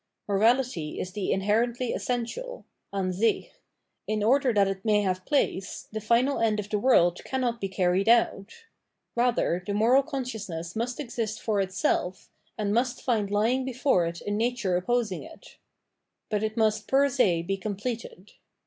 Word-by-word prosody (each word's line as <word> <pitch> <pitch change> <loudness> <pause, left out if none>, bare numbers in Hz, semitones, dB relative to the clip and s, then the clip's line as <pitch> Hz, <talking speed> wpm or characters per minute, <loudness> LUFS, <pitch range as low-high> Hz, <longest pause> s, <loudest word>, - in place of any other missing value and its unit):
Morality 215 -5 +1
is 185 - -4
the 200 0 -2
inherently 230 +5 +1
essential 255 - -4 0.3
(Ansich 195 +2 0 0.3
); - - -53
in 215 -1 -1
order 260 +3 +3
that 200 -3 +3
it 195 0 -4
may 210 -2 +3
have 185 -1 -2
place, 195 -9 -1
the 220 0 -4
final 240 +6 +2
end 220 -2 +2
of 210 0 -6
the 210 - +1
world 180 -8 +3
cannot 245 -3 -2
be 195 - -2
carried 185 +2 +1
out; 235 - +1 0.5
rather, 235 -7 +1
the 200 - -1
moral 235 +6 +5
conscious 255 -8 -5
ness 165 +1 -6
must 240 +5 -2
exist 230 -5 -3
for 210 -3 0
itself, 185 -1 -1 0.3
and 205 -2 -1
must 245 +2 0
find 220 -5 0
lying 225 +6 +1
before 255 -8 +1
it 170 +1 -6
a 205 - -4
nature 220 -3 0
opposing 215 +1 0
it. 330 +10 -14 0.7
But 210 -1 +1
it 220 +1 -2
must 215 -1 +1
fer 275 +1 +4
se 205 -11 +2
be 195 +3 -1
completed. 210 0 -5
215 Hz, 160 wpm, -27 LUFS, 195-245 Hz, 0.7 s, moral